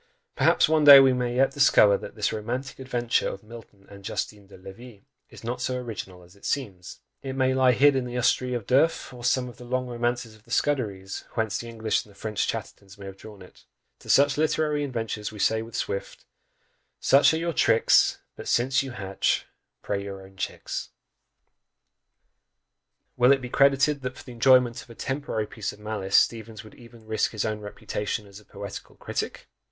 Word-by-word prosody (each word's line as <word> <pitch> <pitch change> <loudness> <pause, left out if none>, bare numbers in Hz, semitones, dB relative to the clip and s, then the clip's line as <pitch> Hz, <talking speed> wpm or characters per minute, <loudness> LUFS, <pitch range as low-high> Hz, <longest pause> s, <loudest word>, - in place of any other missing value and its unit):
Perhaps - - +4
one 155 -1 +2
day 140 -1 +11
we 135 -1 +5
may 125 -1 -2
yet 135 +1 +3
discover 135 -7 +5
that - - -7
this 105 -1 -1
"romantic 120 +6 -4
adventure" 120 -3 0
of 95 - -8
Milton 105 -3 -14
and 100 -1 -13
Justine 100 +1 -5
de 100 - -14
Levis 100 +4 -12 0.3
is - - -14
not 125 +2 -4
so 130 0 -1
original 100 -7 -7
as 90 +2 -19
it 100 - -23
seems 100 -11 -4 0.2
it 135 - -5
may 130 -1 +2
lie 130 -1 +4
hid 140 +3 +5
in 130 -1 0
the 125 0 -6
Astrée 125 +1 +1
of 115 -4 -4
D'Urfé, 135 +4 +1
or 120 -1 -11
some 125 +1 +1
of 120 - -11
the - - -11
long 125 +1 -2
romances 120 -1 -2
of 110 - -22
the 120 - -24
Scuderies, 105 -8 -1
whence 110 -3 -1
the 120 - -7
English 110 -1 -1
and - - -20
the 100 - -19
French 105 -2 -2
Chattertons 100 +1 -6
may 100 - -10
have 95 0 -8
drawn 105 -2 -12
it. 90 - -19 0.3
To - - -14
such 140 +1 +4
literary 150 -1 +1
inventors 115 -5 -4
we 110 - -11
say 110 +2 +1
with 115 0 -9
Swift: 100 - -4 0.7
Such 140 +1 +5
are - - 0
your 170 +1 -2
tricks; 115 -5 +4 0.2
But - - -9
since 130 +2 +2
you 135 -2 -6
hatch, 95 -1 -1 0.4
pray 100 - -2
own 100 - -7
your 95 0 -13
chicks! 95 - -5 2.3
Will 125 +1 +5
it 140 - +4
be 125 -1 -7
credited 140 +2 +3
that 130 0 -5
for - - -11
the 125 - -11
enjoyment 125 +1 +4
of - - -17
a 115 - -12
temporary 135 -5 -3
piece 105 0 -5
of - - -14
malice, 105 -2 0
Steevens 110 -2 0
would 110 - -14
even 115 -2 -16
risk 110 +1 -1
his 110 - -2
own 110 -1 -2
reputation 105 +1 -4
as 100 0 -13
a 105 - -21
poetical 100 -1 -9
critic? - - -5
120 Hz, 200 wpm, -26 LUFS, 105-130 Hz, 2.3 s, day